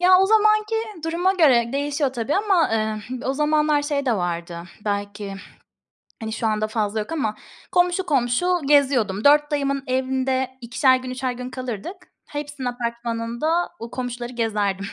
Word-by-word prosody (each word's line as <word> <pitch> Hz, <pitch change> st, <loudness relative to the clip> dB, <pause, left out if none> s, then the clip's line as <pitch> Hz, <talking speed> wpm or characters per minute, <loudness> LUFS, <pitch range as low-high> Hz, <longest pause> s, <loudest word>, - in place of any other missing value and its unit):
Ya, 365 Hz, +1 st, +7 dB
o 385 Hz, -, +4 dB
zamanki 430 Hz, +1 st, +3 dB, 0.3 s
duruma 350 Hz, +3 st, +1 dB
göre 255 Hz, -10 st, +4 dB
değişiyor, 285 Hz, -1 st, 0 dB
tabii, 240 Hz, +3 st, -2 dB
ama, 390 Hz, -, +2 dB
ıh, 220 Hz, +4 st, -2 dB
o -, -, +2 dB
zamanlar 300 Hz, +1 st, +2 dB
şey 285 Hz, -2 st, -1 dB
de 245 Hz, -, +3 dB
vardı, 170 Hz, -1 st, -3 dB, 0.2 s
belki, 205 Hz, -1 st, -3 dB, 0.9 s
hani, 220 Hz, 0 st, -4 dB
şu 225 Hz, 0 st, -1 dB
anda 215 Hz, 0 st, 0 dB
fazla 215 Hz, -1 st, -1 dB
yok 210 Hz, -, -5 dB
ama 245 Hz, -10 st, -1 dB, 0.4 s
komşu 360 Hz, +1 st, +2 dB
komşu 265 Hz, +2 st, +1 dB, 0.2 s
geziyordum. 255 Hz, -9 st, +3 dB
4 295 Hz, +1 st, +5 dB
dayımın 275 Hz, -2 st, 0 dB
evinde 260 Hz, 0 st, -1 dB
ikişer 255 Hz, +2 st, +3 dB
gün, 255 Hz, 0 st, -7 dB
üçer 255 Hz, 0 st, -2 dB
gün 250 Hz, +1 st, -6 dB
kalırdık. 255 Hz, -, -5 dB, 0.3 s
Hepsinin 290 Hz, -3 st, -5 dB
apartmanında 235 Hz, +6 st, -2 dB
o 230 Hz, +1 st, -7 dB
komşuları 245 Hz, -1 st, -5 dB
gezerdim 205 Hz, -4 st, -1 dB
255 Hz, 150 wpm, -23 LUFS, 225-295 Hz, 0.9 s, Ya